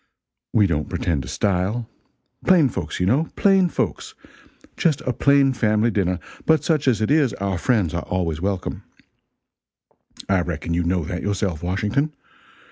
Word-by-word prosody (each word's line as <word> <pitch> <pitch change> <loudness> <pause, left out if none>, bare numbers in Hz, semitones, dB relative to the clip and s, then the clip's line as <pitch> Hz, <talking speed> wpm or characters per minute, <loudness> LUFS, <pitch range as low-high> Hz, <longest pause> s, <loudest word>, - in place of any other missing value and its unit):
We 105 - +4
don't 75 -5 -1
pretend 80 -5 -1
to - - -9
style. 100 +4 -1 0.6
Plain 170 -7 +5
folks, 85 -9 -5
you 90 - +1
know 135 - +2
plain 195 -3 +4
folks. - - -3 0.6
Just 160 -5 +1
a 125 - -2
plain 140 +1 +3
family 110 -1 +1
dinner, 90 -3 0 0.3
but 160 -3 +4
such 155 -4 0
as 115 -4 +2
it 110 - +1
is, 145 -7 +3
our 95 -2 -2
friends 105 -10 +1
are 85 - -1
always 85 -4 -2
welcome, 95 -1 -3 1.5
I 95 -2 +2
reckon 85 -1 -3
you 85 - +1
know 90 0 0
that 90 +3 -4
yourself, 100 -5 -2
Washington. 105 - -1
100 Hz, 155 wpm, -22 LUFS, 90-135 Hz, 1.5 s, Plain